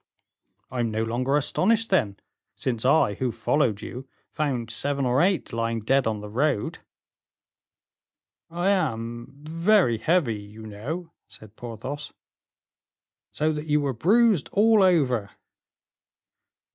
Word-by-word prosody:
"I 125 - -4
am 115 -1 +1
no 110 +1 -1
longer 130 +5 0
astonished, 220 +9 +1
then, 105 - +1 0.4
since 120 -2 -2
I, 135 -6 +4
who 125 +4 -2
followed 115 -1 0
you, 130 +2 -8 0.2
found 125 -7 -2
seven 140 +2 0
or 125 +2 +2
eight 185 -6 +1
lying 115 0 -1
dead 135 +3 +2
on 110 -2 -2
the 105 - -7
road." 125 +1 -1 1.7
"I 175 +3 -1
am 120 - -1
very 165 - +2
heavy, 145 -10 +1
you 105 +2 -12
know," 145 - -6 0.2
said 110 0 -15
Porthos. 120 +6 -7 1.2
"So 155 +1 0
that 150 +1 -5
you 150 0 +3
were 140 -2 -1
bruised 200 - +3
all 215 +1 +4
over." 135 - +2
130 Hz, 125 wpm, -25 LUFS, 115-165 Hz, 1.7 s, I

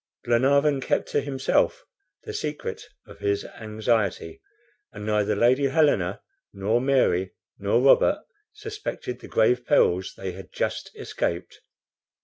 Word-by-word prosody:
Glenarvan 140 +4 +3
kept - - -1
to 145 - +1
himself 140 - 0 0.4
the 435 - -7
secret 445 +1 -4 0.2
of - - -14
his 400 0 -1
anxiety, 110 - -2 0.5
and 105 - -8
neither 105 -1 +1
Lady 130 +6 +3
Helena, 135 - +1 0.3
nor 105 +5 0
Mary, 125 -9 +1 0.2
nor 100 +4 +2
Robert 290 - +4 0.3
suspected 425 - -6
the - - -11
grave 125 +2 +2
perils 95 -9 +2
they 95 -1 -4
had 95 +1 -11
just - - -3
escaped. 85 +1 -4
125 Hz, 125 wpm, -25 LUFS, 105-150 Hz, 0.5 s, Robert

